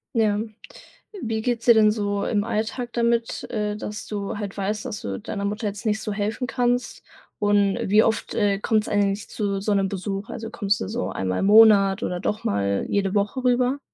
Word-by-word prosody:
Ja. 215 -2 +2 0.8
Wie 225 -3 -2
geht's 235 -1 -1
dir 235 - +7
denn 215 -1 +5
so 205 -2 -1
im 205 -3 0
Alltag 230 +2 -3
damit, 235 -1 0
äh, 210 -1 -2
dass 210 0 -6
du 205 -1 -4
halt 205 -2 -5
weißt, 205 +2 -2
dass 210 - -5
du 95 -1 -4
deiner 200 -1 -5
Mutter 210 +2 -2
jetzt 205 +2 -5
nicht 215 -1 0
so 215 - -4
helfen 215 +5 -2
kannst? 245 0 -1 0.4
Und 205 -1 +3
wie 210 +3 +6
oft, 225 - -1
äh, 200 -1 +1
kommt's 215 0 +1
eigentlich 200 0 0
zu 200 -2 -2
so 205 +1 0
'nem 195 -1 +1
Besuch? 195 +2 -4
Also, 225 -1 -6
kommst 205 -2 0
du - - -3
so 235 +4 -3
einmal 95 -1 -2
im - - +1
Monat 205 -1 +6
oder 180 0 -2
doch 210 - -2
mal 100 0 0
jede 200 -1 0
Woche 210 +6 0
rüber? 250 +2 +2
210 Hz, 200 wpm, -24 LUFS, 200-225 Hz, 0.8 s, dir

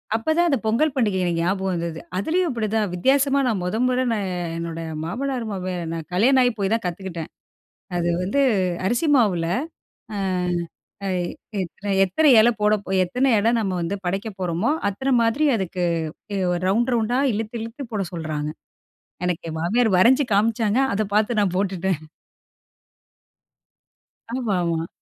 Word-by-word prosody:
அப்பதான் 315 +9 +2
அந்த 275 - +2
பொங்கல் 265 +7 +2
பண்டிகை 210 -7 +1
எனக்கு 170 -1 0
ஞாபகம் 190 +1 0
வந்தது. 170 -1 -3 0.2
அதுலேயும் 340 - +1
அப்பிடிதான் 215 -4 -1
வித்தியாசமா 275 +8 +3
நான் 215 -6 0
முதல் 220 +7 0
முற 255 0 +1
நான் 205 -4 -1 0.3
என்னோட 165 0 -4 0.2
மாமனார் 255 +5 -3
மாமியார் 180 -3 -4
நான் 165 -2 -5
கல்யாணம் 255 +8 +4
ஆகிப் 245 -3 +2
போய் 195 +1 0
தான் 230 - 0
கத்துக்கிட்டேன். 175 -2 -5 0.7
அது 175 0 0
வந்து 200 +10 0 0.5
அரிசி 240 - +1
மாவுல 185 -9 +2 0.7
ஆ, - - -3 0.9
அ - - -1
எத் 175 -1 -4 0.2
எத்தனை 205 +4 -8 0.2
எத்தனை 300 - +3
இலை 235 +2 +6
போட, 210 0 +4 0.3
எத்தனை 250 +9 +1
இலை 225 +3 +3
நம்ம 195 -4 -1
வந்து 175 +4 -2
படைக்கப் 195 +3 -3
போறோமோ! 180 - 0 0.2
அத்தன 265 +7 -1
மாதிரி 230 +7 +2
அதுக்கு 185 -3 -2 0.5
எ - - -1 0.3
ரவுண்ட், 235 +6 +2
ரவுண்டா 235 +2 +1
இழுத்து, 220 +2 -4
இழுத்து 230 +5 -6
போட 205 -2 -1
சொல்றாங்க. 155 -3 -3 0.8
எனக்கு 180 -2 -2
என் 160 - -5
மாமியார் 215 +3 +2
வரஞ்சு 260 +8 +5
காமிச்சாங்க. 220 +2 +2 0.2
அத 215 - +1
பார்த்து 215 +1 +2
நான் 190 -3 +1
போட்டுட்டேன். 190 -4 -1 2.3
ஆமா, 235 -7 -1
ஆமா. 165 -1 -1
205 Hz, 145 wpm, -23 LUFS, 180-240 Hz, 2.3 s, இலை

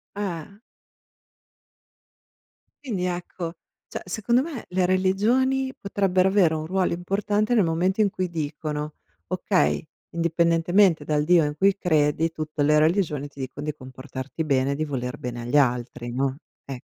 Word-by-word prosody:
Eh. 195 -3 -4 2.3
Quindi 205 -10 -2
ecco, 175 -1 -4 0.3
cioè - - -6
secondo 220 +6 +1
me 295 -7 -6
le 185 0 +1
religioni 235 +9 +2
potrebbero 190 -2 +1
avere 190 -5 +4
un 155 0 -3
ruolo 185 +2 0
importante 205 +5 0
nel 215 - +5
momento 180 +5 +1
in 205 - +4
cui 185 -1 -2
dicono: 150 -1 -4 0.3
"Okay, 75 0 +1 0.3
indipendentemente 170 +1 +3
dal 150 0 +1
Dio 170 +1 +5
in 150 0 -3
cui 195 +3 +4
credi, 160 -2 +2
tutte 155 -1 -4
le 150 +1 +4
religioni 155 -3 +1
ti 140 -1 -16
dicon 135 +2 -5
di 150 0 -2
comportarti 130 +2 -7
bene 135 -2 +1
e - - -1
di 155 +2 -1
voler 125 -4 -4
bene 120 -1 -5
agli 120 +5 +1
altri," 120 -3 0
no, 135 +1 -1 0.3
ecco. 135 -3 -7
165 Hz, 145 wpm, -24 LUFS, 145-190 Hz, 2.3 s, nel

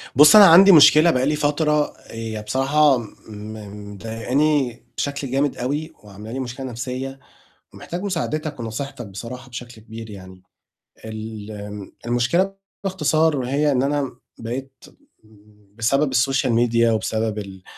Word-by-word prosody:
بُصّ، 150 - +8
أنا 210 -1 +10
عندي 190 +3 +8
مشكلة 155 0 +7
بقى 130 -3 0
لي 150 +2 +1
فترة 150 0 +1
هي 110 -1 -6
بصراحة 135 +5 +3
م 115 -2 -6 0.9
مضايقاني 120 +5 -1
بشكل 140 -2 -3
جامد 140 +1 0
أوي 150 +6 -3
وعاملة 105 +2 -11
لي 130 - -4
مشكلة 130 +1 -6
نَفْسيّة، 130 +2 -5 0.6
ومحتاج 175 +2 -7
مساعدتك 155 -6 -3
ونصيحتك 120 +3 -6
بصراحة 115 +7 -9
بشكل 120 -1 -9
كبير 115 0 -10
يعني. 95 -2 -12 0.6
الم 105 -2 -8
المشكلة 125 +12 +1 0.3
باختصار 160 -6 +1
هي 145 +3 +1
إن 130 -1 +1
أنا 140 -1 -1 0.2
بقيت 130 +4 -7 0.9
بسبب 135 +4 +1
الsocial 130 +2 +2
media 115 0 +2
وبسبب 110 0 -2
ال 95 -2 -8
130 Hz, 125 wpm, -21 LUFS, 115-150 Hz, 0.9 s, أنا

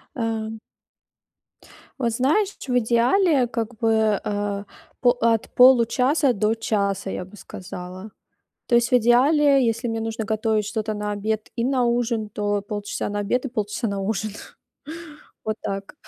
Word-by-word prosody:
А. 225 -2 -3 1.4
Вот 235 -3 +1
знаешь, 315 - +1
ч 260 - -5
в 245 - +4
идеале, 250 - +3
как 235 0 -4
бы, 220 -2 +2
э, 205 -1 -2 0.4
по 245 - +6
от 225 -1 +1
получаса 255 +3 +5
до 215 0 +1
часа, 200 -3 -1
я 180 - -5
бы 200 +3 -15
сказала. 185 +2 -9 0.6
То 240 - 0
есть 235 0 +3
в - - -19
идеале, 270 +4 +4
если 230 +2 -1
мне 225 0 -2
нужно 225 0 -3
готовить 220 -1 0
что-то 215 +1 -3
на 210 0 -3
обед 215 +1 -2
и 235 - 0
на 255 -1 +1
ужин, 235 -2 0
то 205 0 -1
полчаса 205 0 -4
на 205 0 -3
обед 245 +6 -1
и - - -3
полчаса 220 0 -3
на 200 -1 -3
ужин. 215 +1 -2 1.1
Вот 215 0 -2
так. 195 0 -5
225 Hz, 155 wpm, -23 LUFS, 205-245 Hz, 1.4 s, по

